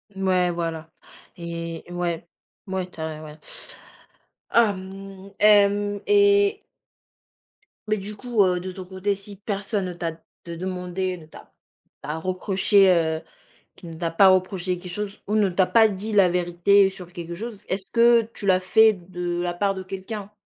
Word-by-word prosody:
Mouais, 185 -2 +1
voilà. 165 -1 -4 0.5
Et 170 -1 -6
ouais, 175 -1 -3 0.4
mouais 185 -1 -3
tu 165 - -16
as 155 -1 -5
ouais. 150 0 -11 1.1
Ah 230 -3 +4
mmh. 195 +1 -10
Hem, 205 -1 +4
et 405 0 +4 1.3
Mais 215 - +1
du 205 +1 -6
coup, 240 -1 0
heu, 180 -1 +1
de 185 0 -5
ton 185 0 -9
côté, 190 +2 -2
si 200 +1 -10
personne 200 0 -3
ne 180 - -4
t'a 170 -1 -3 0.3
de 170 0 -6
demandé 185 +1 -3
ne 160 - -13
t'a 155 - -15 0.5
t'a 150 +2 -4
reproché, 190 +2 +2
heu 160 -2 +2 0.5
qui 175 - -12
ne 165 - -8
t'a 165 0 -2
pas 190 +4 +6
reproché 185 -1 +1
quelque 180 0 -9
chose 210 0 -5
ou 210 - 0
ne 205 -3 +3
t'a 185 +1 +2
pas 225 +1 +5
dit 210 +2 -5
la 195 -3 +5
vérité 180 +3 +3
sur 180 -2 -11
quelque 170 -1 -7
chose, 220 +1 -7
est-ce 190 +1 -3
que 235 0 +5
tu 200 - -7
l'as 185 -1 +4
fait 220 +4 +5
de 175 -1 -4
la 175 0 -2
part 195 +2 0
de 190 - -6
quelqu'un? 195 +2 -7
190 Hz, 165 wpm, -24 LUFS, 175-205 Hz, 1.3 s, pas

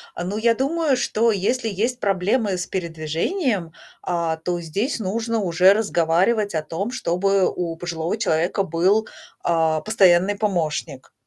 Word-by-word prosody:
а, 175 - -4
но 195 +3 -3
я 230 0 +3
думаю, 285 +1 +1
что 230 -1 +1
если 225 +4 0
есть 235 +6 -2
проблемы 200 +1 0
с 175 - -3
передвижением, 170 - -2 0.3
а, 170 -2 -1
то 175 +2 -3
здесь 200 - -2
нужно 225 +3 -2
уже 185 +1 +4
разговаривать 200 +1 +1
о 155 - -1
том, 195 +9 -4
чтобы 195 -3 +1
у 170 -2 -3
пожилого 170 +3 -3
человека 175 0 0
был, 190 +6 +1 0.4
а, 160 -2 +1
постоянный 195 -1 +3
помощник. 160 -9 -2
190 Hz, 140 wpm, -22 LUFS, 170-220 Hz, 0.4 s, уже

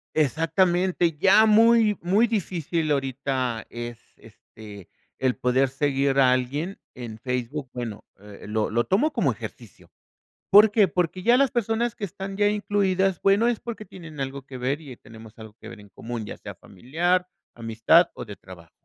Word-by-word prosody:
Exactamente, 165 +3 +1
ya 195 +5 +6
muy 220 0 +5
muy 195 +7 +3
difícil 170 -7 -2
ahorita 130 -4 -2
es 120 0 -7 0.2
este 105 -4 -14 0.3
el 130 -1 +1
poder 130 +1 +1
seguir 135 0 0
a 130 -2 +5
alguien 140 +9 -2 0.2
en 115 -3 -8
Facebook. 125 +3 -4
Bueno, 120 -4 -6 0.2
eh, 105 0 -13
lo 105 0 -1
lo 120 +2 +1
tomo 255 +12 +1
como - - +1
ejercicio, - - -11 0.6
¿por 210 +2 +8
qué? 210 -1 +4
Porque 180 0 -2
ya 240 +1 +5
las 275 0 +3
personas 235 0 -1
que - - -5
están 195 +1 -7
ya 205 0 +3
incluidas, 195 -3 0
bueno, 200 +4 +3
es 240 -2 0
porque 230 -2 -7
tienen 165 -7 -11
algo 135 0 -4
que 130 0 -10
ver 135 +4 -2
y 135 -6 -11
tenemos 110 -1 -15
algo 110 -1 -12
que 110 - -11
ver 115 -2 -11
en 105 - -16
común, 115 +3 -7
ya - - -8
sea - - -10
familiar, 170 - -1 0.3
amistad 115 +9 +3
o - - -7
de 105 -3 -10
trabajo. 85 -3 -14
145 Hz, 170 wpm, -24 LUFS, 120-195 Hz, 0.6 s, por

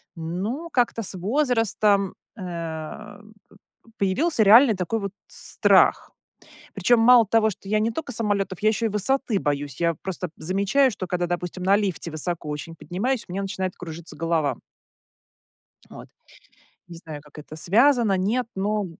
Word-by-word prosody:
Ну, 195 - -4
как-то 240 -2 +1
с - - -4
возрастом, 210 - +1 0.2
э, - - -9
п 180 +5 -8 0.3
п 230 - -22
появился 220 - +1
реальный 225 +2 +7
такой 185 +5 -2
вот 200 -2 -4 0.2
страх. - - +2 0.6
Причем 240 -1 +3
мало 235 0 +7
того, 220 0 +3
что 195 0 -9
я 215 0 +2
не 225 +2 0
только 285 +1 -5
самолетов, 205 -5 -1
я 215 - +4
еще 225 +1 -1
и - - -3
высоты 215 +1 0
боюсь. 145 -1 -3
Я 170 -1 +1
просто 180 -2 -4
замечаю, 200 - +2
что 185 -3 -6
когда, 175 -1 -1
допустим, 175 +1 -4
на 195 +2 +4
лифте 190 -5 -2
высоко 155 0 -3
очень 150 +3 -6
поднимаюсь- 230 +10 -2
у - - -10
меня 195 +2 -3
начинает 190 -1 -3
кружиться 170 -1 -8
голова. 160 -2 0 1.3
Вот. - - -11 0.8
Не 170 - -10
знаю, 160 -3 -9
как 150 0 -16
это, 150 +1 -10
связано, 230 - +3
нет, 220 +6 0
но 205 +1 -1
195 Hz, 155 wpm, -24 LUFS, 175-225 Hz, 1.3 s, реальный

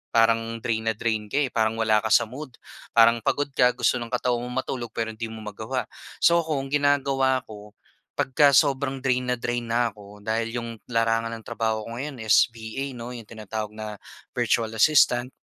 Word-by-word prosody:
parang 115 0 +3
drain 110 -1 -1
na 110 - +1
drain 110 -1 -2
ka, 135 - -3
eh, 130 - -2
parang 110 -1 +1
wala 110 -1 +3
ka 110 - -3
sa - - +6
mood, 130 +3 -9 0.4
parang 115 0 +6
pagod 145 +6 0
ka 125 -2 +4
gusto 120 0 +1
ng 120 - -5
katawan 125 -1 0
mong 130 +1 -2
matulog 120 -3 -4
pero 115 -1 -2
hindi 110 +1 -5
mo 110 -1 -9
magawa. 110 +5 -4 0.4
So 170 0 +6
ako 155 -5 -2
ang 135 - -9
ginagawa 135 -2 +2
ko 105 -1 -12 0.4
pagka 140 +1 +4
sobrang 135 -1 +2
drain 125 -1 +1
na 125 - +1
drain 120 0 -3
na 115 0 +1
ako, 105 -1 -14
dahil 115 +2 -2
yung 115 -1 -3 0.2
larangan 115 -1 0
ng 115 - -12
trabaho 110 -1 -1
ko 115 +1 -6
ngayon 135 -4 -5
is 110 -1 +5
VA 120 +3 -6
'no, 120 0 -7
yung 115 -3 -9
tinatawag 110 -1 -6
na 105 -1 -7 0.3
virtual 115 -2 0
assistant 125 0 +4
115 Hz, 195 wpm, -25 LUFS, 110-130 Hz, 0.4 s, sa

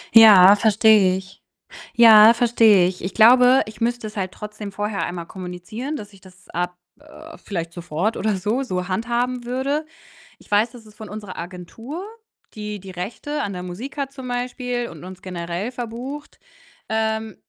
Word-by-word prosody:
Ja, 205 -3 +9
verstehe 215 -3 +4
ich. 190 +1 -12 0.5
Ja, 225 -1 +8
verstehe 225 -5 +4
ich. 180 -2 -7
Ich 185 - -3
glaube, 250 +3 +6
ich 215 0 -12
müsste 240 -1 -1
es 215 - -9
halt 185 -2 -3
trotzdem 210 -1 -8
vorher 205 +1 -3
einmal 175 -1 -5
kommunizieren, 190 - -7
dass 205 -5 -9
ich 195 - -18
das 185 -1 -19
ab, 180 +1 -4 0.2
äh 310 +2 -14
vielleicht 170 -4 -5
sofort 175 +5 -2
oder 215 -2 0
so, 215 +8 -1
so 180 -6 -3
handhaben 240 +4 -2
würde. 270 +5 -2 0.5
Ich - - -22
weiß, 215 +3 +3
dass 240 -3 -14
es 215 - -16
von 215 -1 -10
unserer 205 -3 -8
Agentur, 190 - -8 0.5
die 210 -1 -6
die 190 -1 -10
Rechte 240 +11 -5
an 200 - -4
der 180 -1 -6
Musik 200 +12 -7
hat 275 -1 -3
zum 265 -2 -9
Beispiel 245 0 -3
und - - -12
uns 185 0 -10
generell 175 +4 -5
verbucht 250 +4 -7 0.5
ähm, 220 -1 -2
215 Hz, 170 wpm, -21 LUFS, 185-245 Hz, 0.5 s, Ja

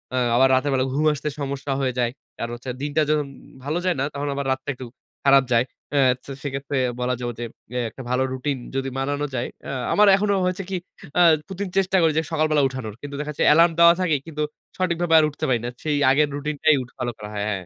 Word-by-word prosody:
আ - - +1 0.2
আবার 130 +2 +6
রাতের 135 +2 +1
বেলা 130 0 +2
ঘুম 150 +3 +1
আসতে 150 +1 -3
সমস্যা 140 0 -3
হয়ে 130 -1 0
যায়। 120 -1 +1 0.3
কারণ 115 - -4
হচ্ছে 120 +2 -8
দিনটা 145 +2 0
যখন 150 -2 +1 0.4
ভালো 150 +4 -1
যায় 180 - +2
না, - - +1
তখন 145 +1 -3
আবার 140 - -3
রাতটা 130 +2 -3
একটু 125 0 -9 0.4
খারাপ 135 -1 +6
যায়। 120 +1 +4 0.3
অ্যা 145 - +3 0.3
তো - - -8
সেক্ষেত্রে 140 0 -3 0.2
বলা 125 +1 0
যাবে 120 -1 -3
যে 120 - -3 0.3
অ্যা 125 - -2
একটা 130 - -11
ভালো 125 +1 +2
রুটিন 135 +2 -2 0.2
যদি 135 0 -1
মানানো 145 +2 -1
যায়। 120 - -1 0.2
আ - - -3 0.2
আমার 210 0 +5
এখনো 200 +1 +1
হয়েছে 185 +1 -1
কি 190 - -2 0.4
আ - - +7 0.3
প্রতিদিন 195 0 -5
চেষ্টা 190 0 +3
করি 160 -1 +4
যে 160 - +2
সকালবেলা 155 -2 +2
উঠানোর। 130 -5 -6
কিন্তু 145 0 -7
দেখা 150 0 -3
যাচ্ছে 150 - -1
এলার্ম 170 +2 +6
দেওয়া 170 0 +8
থাকে 165 -4 +2
কিন্তু 150 -2 -3 0.3
সঠিকভাবে 175 -2 0
আর 155 - +4
উঠতে 150 - -4
পারি 120 - +2
না। - - -2
সেই 150 -2 0
আগের 150 +2 +3
রুটিন 150 +1 -3
টাই 155 -1 +6
উঠ 125 - -9
ফলো 120 -1 -2
করা 105 - -8
হয় 105 -1 -2
হ্যাঁ, 100 - -1
হ্যাঁ। 90 - -12
145 Hz, 235 wpm, -23 LUFS, 130-155 Hz, 0.4 s, দেওয়া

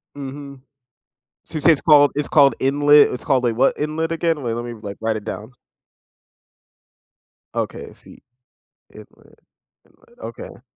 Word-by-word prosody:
Mhm. 140 -1 -9 0.8
So, - - -16
you - - -2
say 165 - +5
it's 150 - -1
called 145 -3 +5
it's 145 0 -3
called 140 -2 +4
inlet 145 +2 +4
it's 125 - -7
called, 135 -3 +1
like, 115 -2 0
what 135 +3 +2
inlet 160 +2 -2
again? 165 -2 -1
Wait, 115 -2 -2
let 120 +1 -5
me, 120 -1 -7
like, 105 -3 -9
write 110 0 -1
it 105 - -7
down. 110 +2 -7 2.0
Okay, - - -4
I - - -16
see. - - -17 0.7
Inlet, - - -18 0.5
inlet, 475 +1 -27
okay. - - -10
140 Hz, 155 wpm, -20 LUFS, 120-150 Hz, 2.0 s, say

